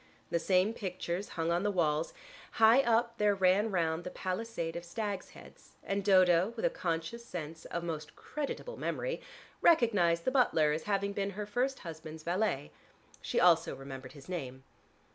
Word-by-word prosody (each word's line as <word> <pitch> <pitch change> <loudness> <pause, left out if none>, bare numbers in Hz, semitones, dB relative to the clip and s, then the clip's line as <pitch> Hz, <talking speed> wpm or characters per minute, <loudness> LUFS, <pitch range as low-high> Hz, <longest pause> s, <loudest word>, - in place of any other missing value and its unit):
The 170 - +2
same 185 +5 +2
pictures 185 -2 -4
hung 165 0 0
on 170 +1 +2
the 205 - +1
walls; 160 -5 +1 0.4
high 225 +4 +6
up 235 -1 +1
there 210 -1 +3
ran 190 +3 +3
round 165 -3 0
the 180 - -5
palisade 185 -3 -3
of 170 - -4
stags' 200 +2 -4
heads - - -16
and 200 0 -1
Dodo 185 0 +5
(with - - -2
a - - +3
conscious 170 - -3
sense 165 -6 -7
of 170 - -4
most 160 -3 -5
creditable 300 - -5
memory) - - -2 0.4
recognized 205 - +4
the 260 - +2
butler 165 - +3
as 155 +1 -2
having 200 -1 0
been 200 0 -1
her 210 - -2
first 250 +6 -1
husband's 160 -2 -8
valet. 175 - -1 0.5
She - - 0
also - - +4
remembered 135 -1 -9
his 140 -3 -13
name. 135 -8 -5
185 Hz, 165 wpm, -32 LUFS, 165-220 Hz, 0.5 s, high